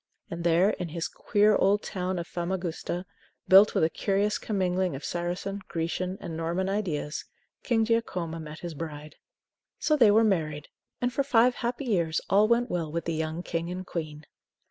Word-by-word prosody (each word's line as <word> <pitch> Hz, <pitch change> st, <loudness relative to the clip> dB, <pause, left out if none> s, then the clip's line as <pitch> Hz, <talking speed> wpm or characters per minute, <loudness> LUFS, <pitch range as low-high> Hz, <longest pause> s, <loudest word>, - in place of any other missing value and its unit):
And 170 Hz, 0 st, -4 dB
there, 175 Hz, +4 st, +4 dB
in 180 Hz, -4 st, -4 dB
his 165 Hz, +1 st, -3 dB
queer 210 Hz, -1 st, +2 dB
old 205 Hz, +2 st, +3 dB
town 185 Hz, -1 st, -3 dB
of 170 Hz, -, -3 dB
Famagusta, 175 Hz, 0 st, -3 dB, 0.4 s
built 195 Hz, +2 st, +7 dB
with -, -, +3 dB
a 160 Hz, -, +4 dB
curious 205 Hz, +1 st, 0 dB
commingling 185 Hz, -4 st, 0 dB
of 135 Hz, -, -7 dB
Saracen, 180 Hz, +3 st, -3 dB
Grecian, 170 Hz, +3 st, -2 dB
and 165 Hz, -, -6 dB
Norman 170 Hz, +3 st, -1 dB
ideas, 175 Hz, -7 st, -2 dB, 0.4 s
King 225 Hz, -3 st, +2 dB
Giacomo 185 Hz, -8 st, -1 dB
met 155 Hz, 0 st, -8 dB
his 175 Hz, -2 st, -5 dB
bride. 150 Hz, -1 st, -7 dB, 0.6 s
So 305 Hz, -, +2 dB
they 240 Hz, -7 st, +6 dB
were 220 Hz, +2 st, +5 dB
married, 155 Hz, -8 st, 0 dB, 0.3 s
and 245 Hz, 0 st, 0 dB
for 280 Hz, -, +1 dB
five 250 Hz, -2 st, +4 dB
happy 245 Hz, +3 st, -3 dB
years 170 Hz, -8 st, +1 dB
all 205 Hz, +2 st, +5 dB
went 235 Hz, +1 st, +2 dB
well 165 Hz, -4 st, -2 dB
with 170 Hz, +1 st, -3 dB
the 165 Hz, -, -1 dB
young 160 Hz, +2 st, -3 dB
King 165 Hz, 0 st, -3 dB
and 185 Hz, +1 st, -5 dB
Queen. 155 Hz, -4 st, -5 dB
180 Hz, 175 wpm, -28 LUFS, 165-205 Hz, 0.6 s, built